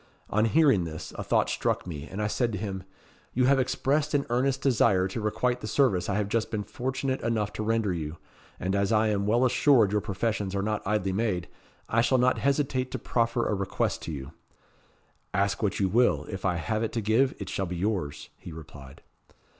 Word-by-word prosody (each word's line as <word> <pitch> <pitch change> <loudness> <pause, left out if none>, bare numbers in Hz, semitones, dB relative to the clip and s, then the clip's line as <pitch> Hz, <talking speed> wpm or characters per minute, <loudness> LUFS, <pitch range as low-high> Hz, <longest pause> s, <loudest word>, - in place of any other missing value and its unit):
On 110 +2 +3
hearing 135 - +4
this, 80 -2 -7
a - - -4
thought - - +2
struck - - -1
me, 80 -3 -6
and 105 +3 -3
I - - +1
said 115 +2 0
to - - -2
him 95 -2 -5 0.5
'You 125 +1 +3
have 135 +1 +4
expressed 145 +4 0
an 140 - +1
earnest 130 +2 +1
desire 100 -8 +3
to 95 +4 -5
requite 120 +4 0
the 110 - -5
service 105 -10 +2
I 95 - 0
have 105 -1 0
just 110 +1 0
been 105 -2 -2
fortunate 130 +3 -3
enough 110 -3 -1
to 110 - -3
render 110 -3 +1
you, 80 -1 -4 0.4
and 95 +1 -1
as 100 +1 +1
I 110 0 +3
am 100 -1 0
well 120 +4 +3
assured 125 -4 +4
your 105 0 +1
professions 100 -1 -2
are 100 - 0
not 105 0 -1
idly 95 -2 0
made, 95 -4 -1 0.4
I 115 - +2
shall 130 +2 +3
not 125 +1 +3
hesitate 135 -2 0
to - - -1
proffer 115 0 0
a - - 0
request 100 -1 -1
to - - -4
you.' 70 -3 -6 1.0
'Ask 100 0 +1
what 105 -4 0
you 95 - +2
will; 120 +6 +2
if 95 -1 -5
I 90 -2 +2
have 85 +7 -1
it 115 - -2
to 115 - -1
give, 115 +6 +2
it - - -6
shall 95 - -2
be 90 0 -4
yours,' 90 -7 -2
he - - -10
replied. 70 -4 -11
105 Hz, 210 wpm, -27 LUFS, 95-125 Hz, 1.0 s, hearing